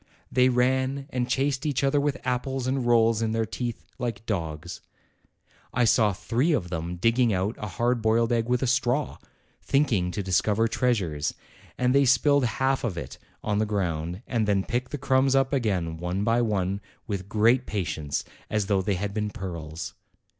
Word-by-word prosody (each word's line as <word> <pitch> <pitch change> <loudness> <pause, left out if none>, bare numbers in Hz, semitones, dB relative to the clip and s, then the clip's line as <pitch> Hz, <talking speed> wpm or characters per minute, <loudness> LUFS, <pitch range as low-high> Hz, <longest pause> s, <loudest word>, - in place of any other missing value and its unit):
They 125 0 +4
ran 130 +2 +1
and 125 -1 -1
chased 135 -1 0
each 145 -3 0
other 140 +1 +3
with 145 -2 -1
apples 125 +1 -1
and 130 -1 0
rolls 115 -1 +4
in 110 -1 0
their 115 0 +1
teeth, 120 +1 -5
like 115 -4 -3
dogs. 85 -4 -4 0.9
I 125 -1 +4
saw 110 -1 +4
three 115 - 0
of 90 - -1
them 85 +1 -3
digging 115 +6 +2
out 95 +3 0
a 105 - -4
hard 120 +5 0
boiled 115 +2 +2
egg 115 0 +1
with 125 +1 +1
a - - +2
straw, 130 +2 0 0.4
thinking 125 -11 +1
to 100 +3 -3
discover 100 +4 +2
treasures, 95 - 0 0.4
and 125 0 +2
they 140 0 +5
spilled 140 +1 +4
half 130 +3 0
of 105 -8 -2
it - - -7 0.2
on 105 -1 0
the 110 - +1
ground, 90 -2 -2
and 115 -4 0
then 100 -2 +2
picked 125 +4 -2
the 145 - -4
crumbs 135 -1 +2
up 135 +1 +2
again 95 -11 0
one 90 +4 -2
by 115 +2 +2
one 100 -3 0 0.2
with 100 -3 -4
great 115 +4 +3
patience, 80 -7 -2 0.3
as 105 -2 0
though 100 -1 +2
they 100 +1 0
had 100 +2 -3
been 105 0 -1
pearls. 85 -5 -6
115 Hz, 180 wpm, -26 LUFS, 95-125 Hz, 0.9 s, they